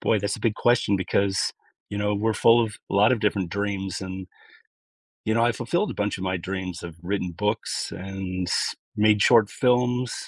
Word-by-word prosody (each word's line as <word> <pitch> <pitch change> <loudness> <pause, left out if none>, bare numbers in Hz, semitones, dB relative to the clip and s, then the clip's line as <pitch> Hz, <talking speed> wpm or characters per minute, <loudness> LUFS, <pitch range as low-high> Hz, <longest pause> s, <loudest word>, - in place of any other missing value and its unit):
Boy, 110 - +2
that's 100 0 -2
a - - -12
big 115 -3 +1
question 120 -4 +2
because, 95 +1 0 0.4
you 100 - -3
know, 105 0 0
we're 110 +2 +1
full 115 +2 +5
of 105 -2 -7
a - - -2
lot 105 +5 +5
of 120 - 0
different 100 -4 0
dreams 100 -1 -3
and, 95 0 -6 1.0
you 110 - +1
know, 115 0 +3
I 120 - +3
fulfilled 175 - -1
a - - -5
bunch 105 0 -1
of 95 - -4
my 95 0 0
dreams. 90 -1 -5
I've 85 -2 -8
written 90 -1 -2
books 105 +5 -2
and 95 -1 -4 0.5
made 105 0 +4
short 110 0 +5
films, 125 -1 +1
100 Hz, 195 wpm, -25 LUFS, 95-115 Hz, 1.0 s, full